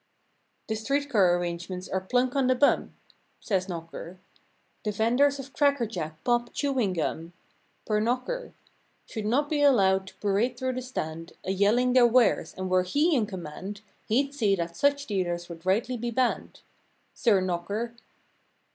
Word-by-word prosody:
The 220 - -2
street 280 +7 -1
car 185 -5 +4
arrangements 175 +1 -4
are 190 - -2
plunk 250 +6 0
on 270 -2 +2
the 255 - +4
bum— 285 +3 +2 0.4
Says 190 -2 -1
knocker; 165 +1 -7 0.7
The 210 - -1
venders 245 +7 +2
of 270 -1 -9
cracker 280 -4 +2
jack, 160 -7 -6
pop, 240 -1 +1
chewing 260 -9 0
gum. 165 0 -3 0.5
Per 215 -1 +1
knocker, 255 - -2 0.5
Should 215 -2 -5
not 280 +6 +2
be 295 -1 0
allowed 190 -9 +4
to - - -12
parade 215 +5 0
through 260 +1 -1
the 255 - -3
stand 165 -10 -5
A 190 - -2
yelling 220 +6 +3
their 250 -2 +7
wares; 240 -1 +3
and 185 0 -3
were 185 0 +3
he 295 - +2
in 225 -6 +1
command 190 +2 -7 0.3
He'd 275 +5 +1
see 210 -8 +2
that 170 -2 -4
such 285 0 +2
dealers 175 -4 -2
would 170 +1 -10
rightly 230 +6 +1
be 240 +1 -3
ban¬ 250 +1 +2
ned— - - -20 0.5
Sir 215 -6 +3
knocker! 190 +6 -2
215 Hz, 165 wpm, -27 LUFS, 185-255 Hz, 0.7 s, their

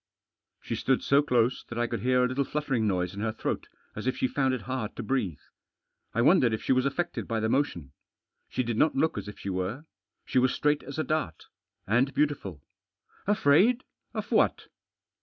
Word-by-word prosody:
She - - -5
stood 130 -1 +1
so 140 +1 +4
close 125 -3 +1
that 120 - -6
I 120 - +2
could 120 0 -3
hear 125 0 +3
a - - +3
little 130 +2 0
fluttering 135 -6 -1
noise 90 -2 0
in 100 - -6
her 110 0 0
throat, 110 - -3 0.3
as - - -5
if 130 - 0
she - - +1
found 130 +1 +1
it 125 - -6
hard 125 -1 -4
to 120 - -5
breathe. 105 - -1 0.8
I 115 - +3
wondered 135 -6 +5
if - - -9
she - - 0
was 130 +1 +2
affected 175 +5 -3
by 115 -1 -1
the 110 - 0
motion. 90 - 0 0.6
She 130 - -1
did 120 -2 -2
not 155 - +3
look 160 +4 +2
as - - -5
if 105 - -8
she 100 - -4
were. 95 - -3 0.4
She 130 - +2
was 130 +1 +2
straight 150 0 +2
as 140 - -8
a 155 - +1
dart. 155 - -2 0.4
And 125 +6 +2
beautiful. 100 - -1 0.6
"Afraid? 205 - +4 0.3
Of - - -4
what?" - - +2
125 Hz, 200 wpm, -28 LUFS, 110-140 Hz, 0.8 s, wondered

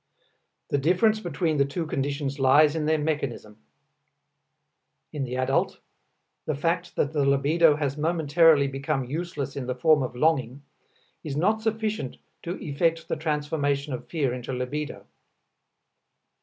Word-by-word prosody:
The 145 - +1
difference 185 +9 +3
between 165 -4 -1
the 140 - +4
two 150 +5 -3
conditions 140 -1 -2
lies 145 +3 +5
in 155 -2 -1
their 155 0 +3
mechanism. 140 -8 -3 1.5
In 140 -3 -2
the 125 0 -4
adult 130 +1 0 0.7
the 155 - 0
fact 170 +4 -1
that 145 - 0
the 145 -2 +1
libido 145 +4 +4
has 145 -2 -2
momentarily 160 -2 +4
become 135 +1 -2
useless 145 -1 -4
in 130 -3 -4
the 125 - -2
form 150 +3 +4
of 125 -1 -4
longing, 135 -2 0 0.6
is 145 -2 -4
not 210 +7 +2
sufficient 215 - -2 0.2
to 175 +2 -4
effect 165 +3 0
the - - 0
transformation 145 -2 -1
of 125 - -6
fear 140 -7 0
into 125 +1 -5
libido. 135 +4 -4
150 Hz, 140 wpm, -26 LUFS, 135-165 Hz, 1.5 s, lies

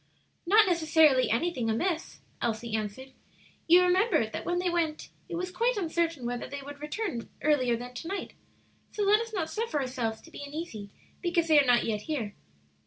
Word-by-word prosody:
"Not 430 +4 +7
necessarily 315 -7 +4
anything 245 -1 0
amiss," 325 +9 -2 0.2
Elsie 230 0 -2
answered. 220 +5 -5 0.5
"You 350 +2 +7
remember 360 - +3
that 220 - -6
when 350 0 0
they 360 +1 0
went 335 -3 -1 0.2
it 350 - -4
was 365 +2 -3
quite 470 +5 +1
uncertain 330 -6 -1
whether 245 0 -3
they 280 -1 -6
would 285 +1 -10
return 300 - -4
earlier 255 -6 +3
than 245 +1 -8
to 325 - -7
night; 390 +2 -4 0.6
so 420 - -2
let 410 +2 +5
us 460 0 -6
not 360 -7 -2
suffer 435 -9 -1
ourselves 245 -4 -2
to 330 - -16
be 285 - -8
uneasy 285 -9 -6 0.3
because 340 -2 +1
they 305 -2 +7
are 275 - -2
not 245 -1 +5
yet 210 -2 -1
here." 235 -7 -3
310 Hz, 180 wpm, -29 LUFS, 245-355 Hz, 0.6 s, Not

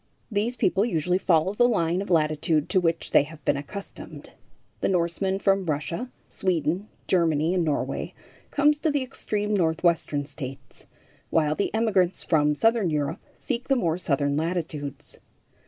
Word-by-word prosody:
These 215 +4 0
people 195 -3 +2
usually 180 -4 0
follow 175 +1 +2
the 240 +3 +4
line 175 -4 +1
of 200 - -6
latitude 155 -1 +1
to 185 - +3
which 165 -1 -1
they - - +6
have 150 +1 -9
been - - +3
accustomed. 170 +8 -8 0.5
The - - 0
Norseman 185 +2 0
from 195 -2 +1
Russia, 155 - -2 0.2
Sweden, 175 +2 -1 0.2
Germany 165 -2 +2
and 180 -2 +1
Norway 150 -3 -2 0.3
comes 295 +1 +3
to 315 - +1
the 285 -2 0
extreme 210 -5 -3
Northwestern 160 -4 +1
States, 135 -2 -9 0.4
while 155 -2 +2
the 200 - -1
emigrants 200 -5 +1
from 150 -2 +2
southern 225 +1 +2
Europe 150 0 -2 0.2
seek 235 +2 -4
the 270 - +3
more 170 -8 0
southern 140 -3 0
latitudes. 155 -3 -4
170 Hz, 150 wpm, -25 LUFS, 155-200 Hz, 0.5 s, they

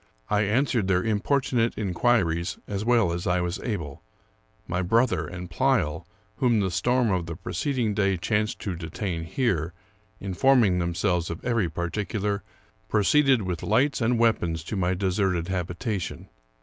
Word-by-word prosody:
I 105 0 +3
answered 115 0 +1
their 95 -1 +2
importunate 115 +2 +1
inquiries 90 -4 +1
as 100 0 -3
well 115 -6 +3
as 85 +1 -3
I 90 0 +2
was 90 0 -2
able. 80 - -4 0.7
My 90 +2 -1
brother 115 +7 +2
and 90 0 -7
Pleyel, 85 - 0 0.3
whom 120 -5 +3
the 95 -2 0
storm 120 +6 +1
of 90 -2 -1
the 85 - -5
preceding 125 - -1
day 100 -2 +1
chanced 105 +4 0
to 95 -4 -3
detain 85 0 -4
here, 85 - -1 0.5
informing 100 0 +3
themselves 85 0 0
of 85 - -6
every 115 -8 +1
particular, 100 +5 -2 0.5
proceeded 130 +3 +3
with 90 -2 -3
lights 130 +6 +1
and 120 +1 +2
weapons 85 -8 +1
to 105 - -5
my 90 -1 +1
deserted 95 -2 0
habi 90 -2 -2
tation. 100 -5 -4
100 Hz, 150 wpm, -26 LUFS, 85-115 Hz, 0.7 s, I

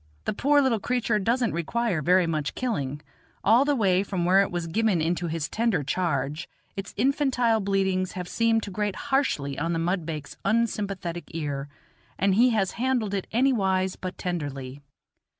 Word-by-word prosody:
The - - 0
poor 285 +6 +3
little 240 -5 +2
creature 235 -2 0
doesn't 235 +3 +1
require 180 +2 -1
very 180 +4 +4
much 155 -3 -2
killing; 150 - -2 0.4
all 230 +7 +5
the 290 0 +2
way 190 -6 +3
from 190 -3 -2
where 190 +2 +5
it 200 - 0
was 175 -1 -3
given 200 +2 +1
into 170 +2 0
his 160 -2 -2
tender 220 -8 0
charge 150 0 -1 0.3
its 195 0 -6
infantile 250 -2 +2
bleatings 190 -2 0
have 180 -1 -5
seemed 225 +1 +1
to 200 - -6
grate 205 +1 -2
harshly 265 - -1
on 165 +3 -1
the - - 0
mudbake's 165 -4 -3
unsympathetic 200 -5 -1
ear, 145 -3 -3 0.5
and 195 0 +2
he 240 +6 +5
has 205 -5 +1
handled 245 -6 0
it 195 -2 -2
anywise 195 -7 +2
but 185 0 -6
tenderly. 145 -6 -4
190 Hz, 165 wpm, -26 LUFS, 165-230 Hz, 0.5 s, all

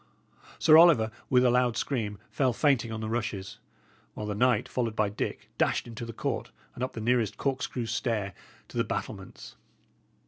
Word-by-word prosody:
Sir 155 0 +7
Oliver, 150 -11 +6 0.2
with 125 -1 +4
a 125 - +5
loud 125 -2 +2
scream, 110 -7 -2
fell 130 -3 +1
fainting 130 -5 +2
on 110 0 -4
the 110 - -3
rushes; 110 -2 -3 0.6
while 105 - -5
the 105 - -2
knight, 125 +1 +2
followed 115 -3 -2
by 105 -2 +1
Dick, 105 - -5
dashed - - +2
into 115 0 -7
the - - -5
court - - -3 0.2
and 125 - -5
up 130 - -3
the - - -6
nearest 115 -1 +1
corkscrew 130 -3 -2
stair 110 -4 -1 0.4
to - - -8
the - - +3
battlements. - - -6
115 Hz, 175 wpm, -28 LUFS, 110-125 Hz, 0.6 s, Sir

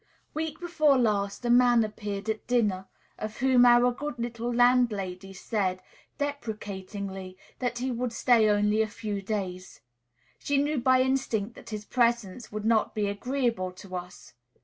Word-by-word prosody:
Week 315 -1 -3
before 310 -5 +3
last 210 -2 0
a - - 0
man 240 -1 +5
appeared 205 -1 -5
at 220 -1 -3
dinner, 210 -6 +1 0.3
of 215 0 -5
whom 255 -1 +5
our 240 +1 +6
good 290 +1 -5
little 235 0 -3
landlady 220 -7 +2
said, 190 -1 -2 0.4
deprecatingly, 200 -8 -5 0.2
that 245 -1 -2
he 255 +2 -2
would 245 0 -2
stay 230 -2 +4
only 210 +1 +3
a 220 - +1
few 210 -1 -5
days. 190 -3 -5 0.6
She 285 - 0
knew 290 0 +1
by 255 +1 +4
instinct 245 -5 -1
that - - -13
his 210 -1 -6
presence 235 -3 0
would 210 0 -5
not 225 -1 +2
be 210 -1 0
agreeable 230 -2 -1
to 185 0 -10
us. 180 -6 -8
225 Hz, 150 wpm, -28 LUFS, 200-245 Hz, 0.6 s, our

